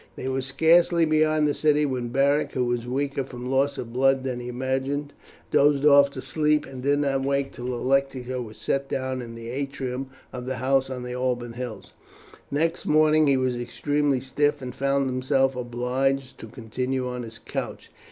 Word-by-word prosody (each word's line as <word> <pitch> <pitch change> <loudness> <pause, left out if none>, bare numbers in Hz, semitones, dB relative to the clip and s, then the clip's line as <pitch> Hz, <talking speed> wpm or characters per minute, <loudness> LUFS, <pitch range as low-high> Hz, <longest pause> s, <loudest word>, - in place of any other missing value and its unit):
They 130 - -5
were 130 0 -1
scarcely 165 +5 +4
beyond 155 -1 +3
the 145 - +1
city 150 0 +2
when 130 -3 -2
Beric, 140 +4 +1
who 125 -1 0
was 120 0 -2
weaker 140 +2 -1
from 125 -1 -7
loss 140 +1 +2
of 115 -1 -6
blood 135 +1 +3
than 130 -2 -3
he 120 - -7
imagined, 130 +3 -2 0.4
dozed 145 0 +4
off 140 -1 +7
to 130 - -6
sleep, 150 -1 +1
and 130 -2 -9
did 140 +2 +2
not 140 -2 +1
wake 140 0 0
till 125 - -7
the 125 - -2
lectica 130 0 0
was 110 -2 -9
set 135 0 -1
down 130 -1 -2
in 115 -1 -8
the 115 0 -7
atrium 135 -1 -4 0.2
of 125 0 -6
the 130 - -2
house 135 +1 +1
on 125 -1 -5
the 125 0 -5
Alban 125 -2 -2
Hills. 120 -4 -7 0.6
Next 165 +4 -1
morning 155 0 +4
he 135 -1 +4
was 130 -2 0
extremely 145 +2 0
stiff, 145 +2 0
and 125 -2 -6
found 140 +1 +1
himself 130 +1 +1
obliged 125 +2 -1
to - - -8
continue 125 +3 -3
on 125 0 -4
his 115 -1 -8
couch. - - -6
135 Hz, 190 wpm, -25 LUFS, 125-140 Hz, 0.6 s, off